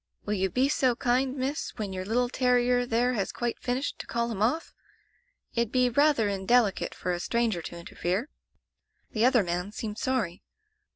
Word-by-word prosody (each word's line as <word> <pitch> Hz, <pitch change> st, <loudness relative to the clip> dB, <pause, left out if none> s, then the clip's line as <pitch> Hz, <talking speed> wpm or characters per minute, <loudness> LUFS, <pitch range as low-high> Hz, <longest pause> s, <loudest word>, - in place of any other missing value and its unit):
Will 210 Hz, -, -1 dB
you 190 Hz, -1 st, +1 dB
be 255 Hz, +7 st, +2 dB
so 260 Hz, -3 st, +2 dB
kind. 255 Hz, +2 st, +1 dB
Miss, 275 Hz, +4 st, -2 dB
when 205 Hz, -4 st, -3 dB
your 185 Hz, 0 st, -3 dB
little 245 Hz, +4 st, +1 dB
terrier 245 Hz, 0 st, +2 dB
there 245 Hz, +2 st, +2 dB
has 200 Hz, -5 st, -1 dB
quite 240 Hz, -1 st, -3 dB
finished, 255 Hz, +3 st, -2 dB
to -, -, -7 dB
call 235 Hz, 0 st, -1 dB
him 205 Hz, -3 st, -4 dB
off? 260 Hz, +10 st, 0 dB, 0.8 s
It'd 235 Hz, -1 st, 0 dB
be 250 Hz, -1 st, +3 dB
rayther 285 Hz, -3 st, +3 dB
indelicate 200 Hz, +2 st, +1 dB
for 180 Hz, -, -2 dB
a 175 Hz, -, -2 dB
stranger 230 Hz, -2 st, 0 dB
to 170 Hz, -, -7 dB
interfere.' 180 Hz, -, -3 dB, 0.8 s
"The 220 Hz, +1 st, +2 dB
other 250 Hz, -4 st, +5 dB
man 180 Hz, +2 st, -2 dB
seemed 215 Hz, 0 st, -5 dB
sorry. 225 Hz, -10 st, -1 dB
235 Hz, 175 wpm, -28 LUFS, 200-250 Hz, 0.8 s, other